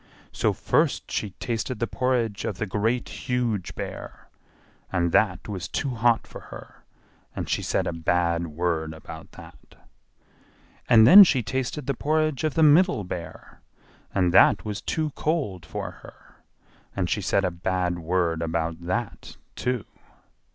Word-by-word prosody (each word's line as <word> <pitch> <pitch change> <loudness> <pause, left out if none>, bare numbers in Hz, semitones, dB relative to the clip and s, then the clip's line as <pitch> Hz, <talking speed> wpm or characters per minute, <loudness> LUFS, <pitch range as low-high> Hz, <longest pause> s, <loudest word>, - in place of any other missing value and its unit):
So - - +1
first - - 0
she 105 - -2
tasted 120 +2 -3
the 115 - -1
porridge 115 -3 -1
of 100 - -3
the 110 - -2
Great 110 +5 -1 0.2
Huge 120 -7 -1
Bear, - - -8 0.6
and 85 -2 0
that 95 -2 +1
was 95 -4 -5
too 140 - -2
hot 120 -1 +2
for - - -10
her; - - -12 0.5
and - - -4
she - - -1
said - - -1
a - - -2
bad 85 +1 0
word 80 0 -2
about 80 0 -11
that. - - -15 1.1
And 110 -2 +7
then 200 - +11
she 135 -9 +2
tasted 130 +4 -3
the 140 - 0
porridge 155 +1 0
of 155 -2 -1
the 160 - +3
Middle 155 - +5
Bear, 90 -2 -8 0.5
and 90 -3 +1
that 95 - +5
was 105 -1 -4
too 155 -2 -2
cold 140 - -2
for - - -5
her; - - -17 0.6
and 90 -3 -1
she 105 - -1
said 95 0 +1
a 90 - 0
bad 90 0 -2
word 85 -1 0
about 80 0 -2
that, 90 - -4 0.2
too. 125 -4 -2
105 Hz, 150 wpm, -25 LUFS, 90-125 Hz, 1.1 s, then